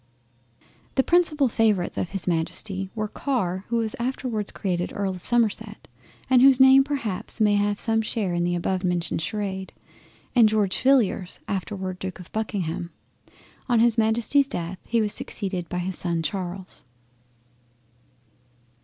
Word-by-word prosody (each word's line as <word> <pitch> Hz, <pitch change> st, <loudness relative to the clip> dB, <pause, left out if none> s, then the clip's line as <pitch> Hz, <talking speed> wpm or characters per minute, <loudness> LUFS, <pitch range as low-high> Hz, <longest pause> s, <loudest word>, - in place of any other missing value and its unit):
The 265 Hz, -, +3 dB
principal 310 Hz, -5 st, +3 dB
favourites 215 Hz, -6 st, +1 dB
of 175 Hz, -, -2 dB
his 195 Hz, -4 st, -4 dB
Majesty 185 Hz, +3 st, -2 dB
were 215 Hz, -1 st, -2 dB
Car, 200 Hz, -7 st, -2 dB
who 235 Hz, -, -2 dB
was 225 Hz, -2 st, -1 dB
afterwards 240 Hz, -4 st, -2 dB
created 180 Hz, -3 st, -2 dB
Earl 200 Hz, -1 st, -1 dB
of 185 Hz, -2 st, -8 dB
Somerset 235 Hz, -4 st, 0 dB, 0.4 s
and 255 Hz, -2 st, +5 dB
whose 270 Hz, -1 st, +7 dB
name 265 Hz, +1 st, +8 dB
perhaps 235 Hz, -8 st, -3 dB
may 210 Hz, -1 st, +4 dB
have 205 Hz, 0 st, +1 dB
some 225 Hz, -1 st, +2 dB
share 215 Hz, -4 st, -2 dB
in 175 Hz, 0 st, 0 dB
the 175 Hz, 0 st, 0 dB
above 185 Hz, +2 st, -1 dB
mentioned 175 Hz, -2 st, -1 dB
Sharade, 190 Hz, +2 st, -3 dB, 0.7 s
and 230 Hz, -3 st, +6 dB
George 210 Hz, -3 st, 0 dB
Villiers 235 Hz, -9 st, +2 dB
afterwards 190 Hz, -1 st, -4 dB
Duke 190 Hz, -1 st, -6 dB
of 180 Hz, -, -12 dB
Buckingham. 185 Hz, -6 st, -3 dB, 0.8 s
On 240 Hz, -2 st, +4 dB
his 235 Hz, 0 st, +4 dB
Majesty's 235 Hz, +5 st, +2 dB
death 175 Hz, -4 st, -4 dB
he 230 Hz, -1 st, +2 dB
was 210 Hz, -1 st, 0 dB
succeeded 185 Hz, -5 st, -3 dB
by 180 Hz, -, -3 dB
his 180 Hz, +1 st, -3 dB
son 170 Hz, -2 st, -1 dB
Charles. 185 Hz, +1 st, -5 dB
205 Hz, 145 wpm, -24 LUFS, 185-230 Hz, 0.8 s, name